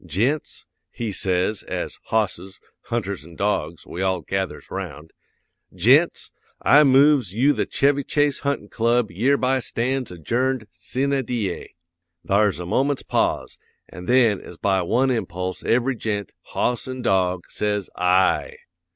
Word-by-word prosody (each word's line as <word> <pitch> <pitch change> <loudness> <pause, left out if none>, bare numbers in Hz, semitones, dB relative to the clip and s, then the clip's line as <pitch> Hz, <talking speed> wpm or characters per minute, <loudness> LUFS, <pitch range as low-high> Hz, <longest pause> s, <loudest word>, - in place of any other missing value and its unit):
"Gents," 115 - -1 0.2
he 115 -3 -4
says, 95 +2 0
as - - -5
hosses, 95 -3 -2 0.3
hunters 100 -7 -3
an' 85 +1 -14
dogs 85 -5 -2
we 90 - -6
all 95 -2 0
gathers 95 +3 -4
'round, 75 +2 -7 0.6
"gents, 130 - +3 0.3
I 150 +1 +6
moves 135 -7 +4
you 135 +6 +4
the - - -1
Chevy 140 0 +2
Chase 145 0 +1
Huntin' 140 -8 -2
Club 115 -1 +1
yereby 130 +6 +2
stands 125 0 -2
adjourned 120 - -1
sine 135 +1 -1
die." 110 -7 -4 0.5
Thar's 100 0 +2
a 90 - -5
moment's 135 +9 0
pause, - - -1 0.3
an' 90 - -9
then 120 -5 +3
as 90 - -11
by 95 0 +1
one 125 +9 +2
impulse 90 -5 -3
every 125 +3 +1
gent, 105 -3 -3
hoss 120 0 -1
an' 130 -1 -5
dog, 90 -2 +1
says 105 -2 -1
"Ay!" 90 +1 +2
110 Hz, 135 wpm, -23 LUFS, 95-130 Hz, 0.6 s, I